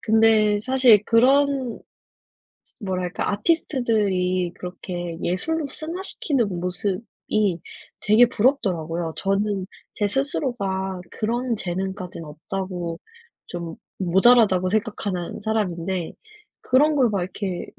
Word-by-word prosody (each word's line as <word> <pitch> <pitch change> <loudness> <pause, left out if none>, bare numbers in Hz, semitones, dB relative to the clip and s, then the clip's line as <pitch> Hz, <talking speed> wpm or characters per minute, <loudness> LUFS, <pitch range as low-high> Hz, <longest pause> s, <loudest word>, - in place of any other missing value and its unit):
근데 220 -2 +4
사실 255 -5 +5
그런 265 +1 +3 1.0
뭐랄까 185 -2 -2
아티스트들이 205 - +1
그렇게 175 -2 -6
예술로 295 - -1
승화시키는 315 - -2
모습이 185 0 -2 0.4
되게 215 +3 +6
부럽더라고요. 175 - 0
저는 195 0 0 0.3
제 205 - +1
스스로가 200 -7 -2
그런 240 +2 -1
재능까지는 185 -3 -4
없다고 175 +2 -5 0.5
좀 170 -2 -6 0.2
모자라다고 190 0 +4
생각하는 205 -4 -2
사람인데 190 -5 -2 0.5
그런 295 +4 +3
걸 260 -4 +4
막 200 -3 -1
이렇게 185 -1 -4
200 Hz, 255 characters per minute, -23 LUFS, 180-240 Hz, 1.0 s, 되게